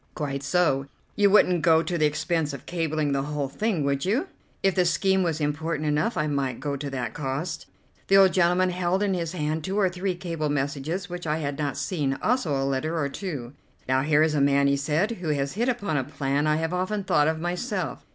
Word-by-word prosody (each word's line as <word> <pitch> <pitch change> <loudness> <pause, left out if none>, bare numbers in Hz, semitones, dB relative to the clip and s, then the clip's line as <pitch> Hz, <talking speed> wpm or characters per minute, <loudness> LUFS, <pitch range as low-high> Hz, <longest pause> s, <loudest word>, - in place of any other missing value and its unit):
"Quite 140 -2 -3
so. 140 -3 +1 0.3
You 205 -1 +4
wouldn't 180 -4 +4
go 160 0 +4
to 175 - -3
the 155 -2 +3
expense 150 0 -1
of 140 - -8
cabling 155 -4 -1
the 140 0 +1
whole 145 0 -2
thing, 195 +1 -1
would 140 -1 0
you?" 225 - +1 0.4
"If 195 -1 +3
the 180 - +3
scheme 190 +3 +2
was 165 -3 0
important 155 +1 -1
enough 150 +11 0
I 150 - +1
might 140 -4 -1
go 145 0 -2
to 140 +1 -4
that 125 -4 -4
cost." 150 +4 -4 0.4
The 195 - +6
old 190 -2 +6
gentleman 180 0 +3
held 180 +2 0
in 200 -2 +1
his 170 -2 -2
hand 155 -1 -2
two 190 +4 -2
or 190 -3 +3
three 185 +1 -2
cable 165 -4 -3
messages 145 +5 -2
which 175 -2 -6
I 155 +1 +1
had 145 -2 -3
not 145 -3 -2
seen, 145 -7 -1
also 210 - +1
a 135 - 0
letter 140 +5 -1
or 145 -3 0
two. 140 -7 -6 0.3
"Now, 130 +1 +2
here 150 +1 +3
is 160 -1 +2
a 145 - +1
man," 140 0 +4
he 140 0 +3
said, 150 +9 0
"who 180 -8 -4
has 140 -2 -1
hit 235 +6 0
upon 205 -11 -1
a 135 - 0
plan 140 +1 -1
I 150 - +3
have 160 +2 -1
often 190 +3 -1
thought 150 -5 +3
of 160 0 0
myself. 180 +3 -3
155 Hz, 225 wpm, -25 LUFS, 140-180 Hz, 0.4 s, The